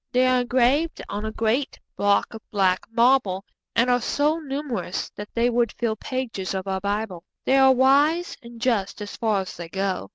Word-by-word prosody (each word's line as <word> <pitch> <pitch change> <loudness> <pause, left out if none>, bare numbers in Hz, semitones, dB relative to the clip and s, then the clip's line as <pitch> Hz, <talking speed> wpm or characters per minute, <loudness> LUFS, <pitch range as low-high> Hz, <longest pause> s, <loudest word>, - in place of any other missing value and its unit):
They 250 +1 +3
are 255 -1 +3
engraved 260 +6 +2
on 205 +2 -4
a 220 - -3
great 230 +6 -1 0.2
block 205 +2 +2
of 225 - -8
black 190 -3 +1
marble, 230 -5 +3 0.3
and 235 +2 +3
are 245 0 +3
so 295 +6 +1
numerous 270 - -4
that 205 0 -8
they 235 +1 +3
would 240 -2 +1
fill 230 -2 -1
pages 225 -6 -4
of 190 0 -3
our 190 0 -1
Bible. 200 -3 -3 0.2
They 270 - +4
are 265 0 +7
wise 285 +7 +3
and 235 -1 -12
just 225 -6 0
as 205 - -8
far 215 -4 +1
as 190 - -8
they 170 -1 -8
go. 190 - -2
235 Hz, 190 wpm, -24 LUFS, 200-260 Hz, 0.3 s, are